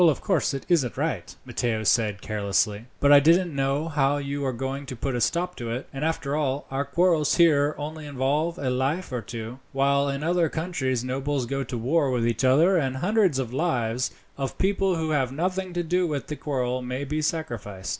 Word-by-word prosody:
"Of 150 Hz, -, 0 dB
course 170 Hz, -7 st, +1 dB
it 135 Hz, -, -6 dB
isn't 145 Hz, -9 st, +1 dB
right," -, -, -2 dB
Matteo 110 Hz, -3 st, -1 dB
said 105 Hz, -2 st, +2 dB
carelessly, 105 Hz, +1 st, 0 dB
"but 145 Hz, -, +4 dB
I 145 Hz, -, +10 dB
don't 170 Hz, +3 st, +4 dB
know 140 Hz, +3 st, 0 dB
how 145 Hz, -2 st, +1 dB
you 140 Hz, 0 st, -3 dB
are -, -, +1 dB
going 135 Hz, +3 st, -4 dB
to 130 Hz, -, -5 dB
put 135 Hz, +3 st, -3 dB
a 120 Hz, -, -1 dB
stop 180 Hz, +8 st, 0 dB
to 120 Hz, -1 st, -5 dB
it; 120 Hz, +3 st, -4 dB
and 135 Hz, +2 st, -4 dB
after 155 Hz, -3 st, -1 dB
all, 145 Hz, -2 st, -1 dB
our 135 Hz, +1 st, 0 dB
quarrels 165 Hz, 0 st, +2 dB
here 150 Hz, -4 st, +4 dB
only 150 Hz, +1 st, -6 dB
involve 145 Hz, +5 st, 0 dB
a 130 Hz, -2 st, -1 dB
life 135 Hz, +8 st, -1 dB
or 125 Hz, -2 st, -2 dB
two, 115 Hz, +3 st, -7 dB
while 140 Hz, +1 st, +2 dB
in 140 Hz, +1 st, -3 dB
other 170 Hz, 0 st, +2 dB
countries 145 Hz, -8 st, -2 dB
nobles 135 Hz, +1 st, -1 dB
go 135 Hz, +2 st, -2 dB
to 125 Hz, -, -4 dB
war 140 Hz, +5 st, +1 dB
with 125 Hz, -2 st, 0 dB
each 115 Hz, +2 st, -1 dB
other, 155 Hz, +9 st, +5 dB
and 135 Hz, -4 st, 0 dB
hundreds 190 Hz, -1 st, +2 dB
of 125 Hz, -3 st, -3 dB
lives, 125 Hz, -6 st, 0 dB, 0.3 s
of 135 Hz, -1 st, -3 dB
people 195 Hz, -1 st, +1 dB
who 160 Hz, -1 st, -1 dB
have 135 Hz, -4 st, +1 dB
nothing 185 Hz, +5 st, -2 dB
to 175 Hz, 0 st, -1 dB
do 180 Hz, +2 st, +1 dB
with 145 Hz, -3 st, -3 dB
the 150 Hz, -, -5 dB
quarrel, 130 Hz, -4 st, -2 dB
may 125 Hz, +2 st, -4 dB
be 150 Hz, +2 st, -2 dB
sacrificed." 120 Hz, -, -3 dB
140 Hz, 205 wpm, -25 LUFS, 125-160 Hz, 0.3 s, I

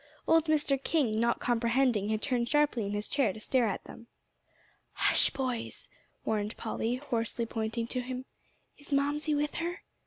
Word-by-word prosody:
Old 325 Hz, -1 st, +5 dB
Mr. 295 Hz, -3 st, +1 dB
King, 255 Hz, -10 st, +1 dB
not 235 Hz, +1 st, +2 dB
comprehending, 235 Hz, -2 st, +2 dB
had 215 Hz, 0 st, -1 dB
turned 240 Hz, -3 st, 0 dB
sharply 295 Hz, -8 st, +2 dB
in 200 Hz, -, -3 dB
his 205 Hz, +1 st, -2 dB
chair 275 Hz, -8 st, +2 dB
to 220 Hz, -, -9 dB
stare 245 Hz, +2 st, +2 dB
at 195 Hz, -, -3 dB
them. 230 Hz, -, -12 dB, 0.9 s
"Hush, -, -, +4 dB
boys," 255 Hz, -4 st, -3 dB, 0.4 s
warned 210 Hz, 0 st, -1 dB
Polly, 230 Hz, +1 st, -1 dB
hoarsely 235 Hz, -3 st, -2 dB
pointing 225 Hz, +1 st, -2 dB
to 250 Hz, +2 st, -2 dB
him; 255 Hz, +1 st, -5 dB, 0.5 s
"is 290 Hz, -, -14 dB
Mamsie 290 Hz, +2 st, +1 dB
with 295 Hz, +1 st, 0 dB
her?" 345 Hz, +2 st, -3 dB
245 Hz, 160 wpm, -30 LUFS, 225-285 Hz, 0.9 s, Old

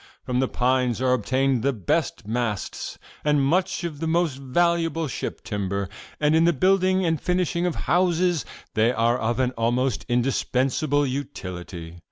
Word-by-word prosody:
'From 125 Hz, 0 st, -1 dB
the 130 Hz, -, +2 dB
pines 125 Hz, -1 st, +1 dB
are 130 Hz, 0 st, +2 dB
obtained 130 Hz, +2 st, +1 dB
the 140 Hz, -, +2 dB
best 100 Hz, -3 st, -1 dB
masts 115 Hz, -3 st, -3 dB, 0.3 s
and 150 Hz, -2 st, +3 dB
much 175 Hz, +3 st, +1 dB
of 160 Hz, -4 st, -4 dB
the 165 Hz, -, -2 dB
most 165 Hz, -3 st, +1 dB
valuable 165 Hz, +3 st, +1 dB
ship -, -, -5 dB
timber, 100 Hz, -3 st, -2 dB, 0.3 s
and 150 Hz, +1 st, +3 dB
in 160 Hz, -, +5 dB
the 170 Hz, -, +4 dB
building 185 Hz, +3 st, +3 dB
and 160 Hz, -2 st, 0 dB
finishing 180 Hz, -1 st, 0 dB
of 175 Hz, -, -2 dB
houses 175 Hz, -1 st, +2 dB, 0.3 s
they 110 Hz, +2 st, +3 dB
are 120 Hz, 0 st, +1 dB
of 115 Hz, +2 st, -1 dB, 0.2 s
almost 120 Hz, +2 st, 0 dB
indispensable 135 Hz, +3 st, +1 dB
utility. 90 Hz, -, -6 dB
135 Hz, 150 wpm, -24 LUFS, 120-165 Hz, 0.3 s, in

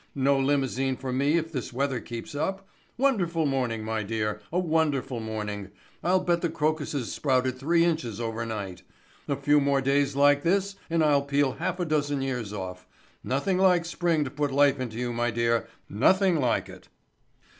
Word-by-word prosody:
No 140 Hz, 0 st, +2 dB
limousine 135 Hz, -1 st, 0 dB
for 130 Hz, -1 st, -4 dB
me 140 Hz, +5 st, +2 dB
if 165 Hz, 0 st, -2 dB
this 130 Hz, -4 st, -4 dB
weather 130 Hz, 0 st, -1 dB
keeps 115 Hz, +2 st, -7 dB
up. 190 Hz, +6 st, -3 dB, 0.3 s
Wonderful 185 Hz, -, +1 dB
morning, 125 Hz, -5 st, -1 dB
my 110 Hz, 0 st, -2 dB
dear, 105 Hz, 0 st, -2 dB
a 175 Hz, -, -1 dB
wonderful 150 Hz, -7 st, 0 dB
morning. 105 Hz, -3 st, -5 dB, 0.3 s
I'll 180 Hz, +2 st, +3 dB
bet 175 Hz, -1 st, +1 dB
the 170 Hz, -, 0 dB
crocuses 150 Hz, -5 st, -1 dB
sprouted 130 Hz, -2 st, 0 dB
three 165 Hz, +5 st, +3 dB
inches 155 Hz, -, -1 dB
over 115 Hz, -1 st, -3 dB
night. 100 Hz, -5 st, -5 dB, 0.5 s
A 140 Hz, -, 0 dB
few 145 Hz, +2 st, +3 dB
more 140 Hz, -1 st, +2 dB
days 140 Hz, +1 st, +1 dB
like 145 Hz, 0 st, +5 dB
this 195 Hz, +4 st, +1 dB
and 165 Hz, -1 st, +2 dB
I'll 145 Hz, -2 st, +4 dB
peel 140 Hz, -1 st, +1 dB
a -, -, -10 dB
half 180 Hz, -, -2 dB
dozen 145 Hz, -3 st, 0 dB
years 125 Hz, -6 st, -3 dB
off. 95 Hz, -3 st, -6 dB, 0.4 s
Nothing 180 Hz, +9 st, 0 dB
like 180 Hz, -3 st, +4 dB
spring 170 Hz, -2 st, 0 dB
to 130 Hz, -, -5 dB
put 145 Hz, 0 st, -1 dB
life 140 Hz, 0 st, +4 dB
into 120 Hz, -3 st, -4 dB
you, 120 Hz, 0 st, -2 dB
my 120 Hz, +1 st, 0 dB
dear, 115 Hz, 0 st, 0 dB, 0.2 s
nothing 185 Hz, -, +3 dB
like 125 Hz, -4 st, +1 dB
it." -, -, -13 dB
140 Hz, 175 wpm, -27 LUFS, 120-160 Hz, 0.5 s, like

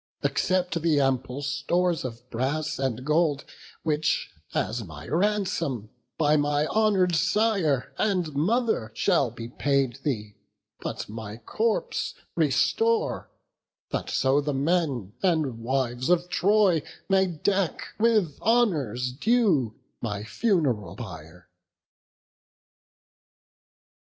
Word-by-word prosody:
Accept 180 Hz, -3 st, +1 dB
the 160 Hz, -3 st, +3 dB
ample 135 Hz, 0 st, 0 dB
stores 165 Hz, +5 st, 0 dB
of 120 Hz, -1 st, -7 dB
brass 140 Hz, +6 st, -1 dB
and 130 Hz, -2 st, -2 dB
gold, 150 Hz, -1 st, +2 dB, 0.4 s
Which 155 Hz, -1 st, 0 dB, 0.2 s
as 115 Hz, +1 st, -1 dB
my 80 Hz, -3 st, -10 dB
ransom 170 Hz, -, 0 dB, 0.3 s
by 150 Hz, -1 st, +3 dB
my 145 Hz, 0 st, +1 dB
honour'd 195 Hz, -3 st, +2 dB
sire 190 Hz, -, +1 dB
And 180 Hz, -7 st, +1 dB
mother 195 Hz, -, +1 dB
shall 170 Hz, -, +2 dB
be 115 Hz, 0 st, -8 dB
paid 135 Hz, -1 st, 0 dB
thee; 105 Hz, -8 st, -3 dB, 0.4 s
but -, -, -5 dB
my 110 Hz, 0 st, -7 dB
corpse 215 Hz, -, -1 dB, 0.2 s
Restore, 455 Hz, 0 st, +1 dB, 0.6 s
that -, -, -2 dB
so 135 Hz, +2 st, +2 dB
the 145 Hz, -1 st, -2 dB
men 140 Hz, -, 0 dB
and 155 Hz, -10 st, +1 dB
wives 125 Hz, +1 st, -1 dB
of 180 Hz, 0 st, +2 dB
Troy 190 Hz, -3 st, +3 dB, 0.3 s
May 190 Hz, -1 st, +3 dB
deck 185 Hz, +2 st, -1 dB
with 215 Hz, -9 st, +2 dB
honours 150 Hz, -, +2 dB
due 155 Hz, -, +2 dB, 0.3 s
my 105 Hz, -3 st, -3 dB
fun'ral 120 Hz, -, 0 dB
pyre." 90 Hz, -6 st, -10 dB
145 Hz, 105 wpm, -26 LUFS, 125-180 Hz, 0.6 s, the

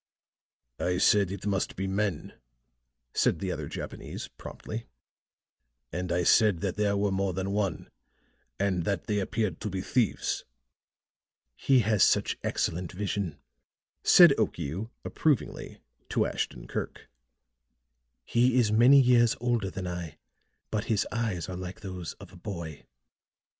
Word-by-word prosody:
"I 90 Hz, 0 st, 0 dB
said 100 Hz, +1 st, +4 dB
it 95 Hz, 0 st, -6 dB
must 100 Hz, -2 st, -1 dB
be 95 Hz, -, -3 dB
men," 95 Hz, -4 st, -2 dB, 0.8 s
said -, -, +2 dB
the -, -, -3 dB
other -, -, -4 dB
Japanese -, -, -6 dB
promptly. 115 Hz, +1 st, -8 dB, 1.0 s
"And 90 Hz, +2 st, -3 dB
I 90 Hz, +1 st, +1 dB
said 105 Hz, -1 st, +4 dB
that 100 Hz, -3 st, -1 dB
there 100 Hz, -1 st, +1 dB
were 100 Hz, 0 st, +1 dB
more 95 Hz, 0 st, 0 dB
than 95 Hz, +2 st, -2 dB
one, 100 Hz, -5 st, -1 dB, 0.7 s
and 95 Hz, -4 st, +1 dB
that 100 Hz, -5 st, -1 dB
they 105 Hz, -1 st, 0 dB
appeared 100 Hz, -3 st, -2 dB
to 105 Hz, -, -2 dB
be 95 Hz, -1 st, -3 dB
thieves." 115 Hz, +1 st, 0 dB, 1.1 s
"He 130 Hz, -, +3 dB
has 105 Hz, -2 st, +1 dB
such -, -, +3 dB
excellent 85 Hz, +1 st, -1 dB
vision," 100 Hz, -4 st, -3 dB, 0.7 s
said -, -, +8 dB
Okiu, 95 Hz, +11 st, -2 dB, 0.2 s
approvingly, 150 Hz, -7 st, -1 dB, 0.3 s
to -, -, +2 dB
Ashton -, -, -3 dB
Kirk. -, -, -5 dB, 1.2 s
"He 125 Hz, +1 st, +3 dB
is 115 Hz, -4 st, +3 dB
many 120 Hz, +6 st, +7 dB
years 120 Hz, -3 st, +5 dB
older 120 Hz, -4 st, 0 dB
than 95 Hz, 0 st, -6 dB
I, 85 Hz, -3 st, -5 dB, 0.5 s
but 110 Hz, -1 st, -1 dB
his 110 Hz, -3 st, +1 dB
eyes 110 Hz, -7 st, -2 dB
are 95 Hz, -, -5 dB
like 90 Hz, +1 st, -7 dB
those 95 Hz, -4 st, -6 dB
of 95 Hz, -2 st, -14 dB
a -, -, -12 dB
boy. 85 Hz, -6 st, -7 dB
100 Hz, 135 wpm, -28 LUFS, 90-110 Hz, 1.2 s, said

